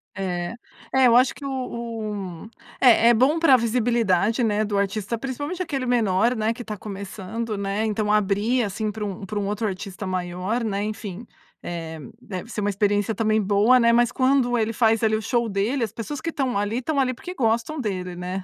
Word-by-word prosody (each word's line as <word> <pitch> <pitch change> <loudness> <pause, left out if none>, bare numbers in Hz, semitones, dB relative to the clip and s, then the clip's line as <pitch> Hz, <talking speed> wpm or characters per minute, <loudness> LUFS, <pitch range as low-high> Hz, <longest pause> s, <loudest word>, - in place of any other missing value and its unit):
É. 180 -1 -3 0.4
É, 265 -1 +5
eu 235 - +5
acho 250 +1 +5
que 285 - -9
o - - -2 0.2
o 215 -6 -5 0.3
É, 235 -2 +6
é - - +7
bom 265 +8 +3
pra 280 -6 +6
visibilidade, 230 -2 +1
né, 215 -1 +1
do 205 -1 -1
artista, 200 +3 -1
principalmente 290 +8 -4
aquele 280 -7 -2
menor, 230 -1 +2
né, 220 0 0
que 245 - -9
está 215 -3 -6
começando, 205 +2 -5
né? 200 +2 -1
Então, 210 -1 0
abrir, 210 +4 +2
assim, 210 +1 -2
para 215 0 -6
um 195 -1 -5
para 205 +2 -3
um 200 - -2
outro 210 +2 -1
artista 195 0 -5
maior, 185 +5 -2
né, 205 -2 -1
enfim, 210 0 -5 0.4
eh, 165 -2 -5 0.2
deve 195 +1 -7
ser 210 - -3
uma 205 - +1
experiência 205 +1 +1
também 215 +1 +2
boa, 210 +5 +4
né, 235 -1 +5
mas 240 0 +3
quando 255 -1 +2
ele 225 0 0
faz 225 0 +2
ali 220 0 +3
o 215 - -2
show 235 +1 0
dele, 215 +6 0
as 220 - -2
pessoas 235 +5 -6
que 335 - -2
estão 265 -8 -1
ali, 205 +3 -1
estão 280 +3 -1
ali 255 -1 +2
porque 355 +9 -8
gostam 235 +3 0
dele, 185 -6 -3
né? 180 +2 -4
220 Hz, 200 wpm, -24 LUFS, 200-240 Hz, 0.4 s, é